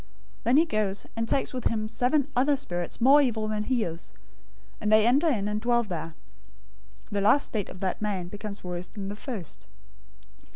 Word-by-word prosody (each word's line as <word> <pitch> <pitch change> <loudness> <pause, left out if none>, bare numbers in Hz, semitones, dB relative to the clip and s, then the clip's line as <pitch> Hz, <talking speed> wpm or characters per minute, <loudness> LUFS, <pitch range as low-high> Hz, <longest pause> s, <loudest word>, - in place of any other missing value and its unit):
012:045 - - -26 0.4
Then 245 +4 +4
he 320 - +6
goes, 215 -9 -1
and 230 0 -2
takes 270 - 0
with 255 -2 -4
himself 215 -1 0
seven 265 +3 +2
other 275 +3 +3
spirits 175 -10 -4
more 275 +5 +7
evil 225 -5 0
than 215 0 -2
he 250 -2 +1
is, 165 - -6 0.7
and 210 - 0
they 215 0 +6
enter 275 +8 +4
in 215 -10 +1
and 210 0 -2
dwell 240 0 +2
there. 165 -5 -5 1.0
The 205 -1 0
last 215 +8 +4
state 210 -4 -3
of 185 - -11
that 190 +1 -2
man 195 -4 -2
becomes 205 +2 -7
worse 180 0 -4
than 195 -2 -6
the 205 - -5
first. 195 - -8
215 Hz, 195 wpm, -27 LUFS, 195-250 Hz, 1.0 s, more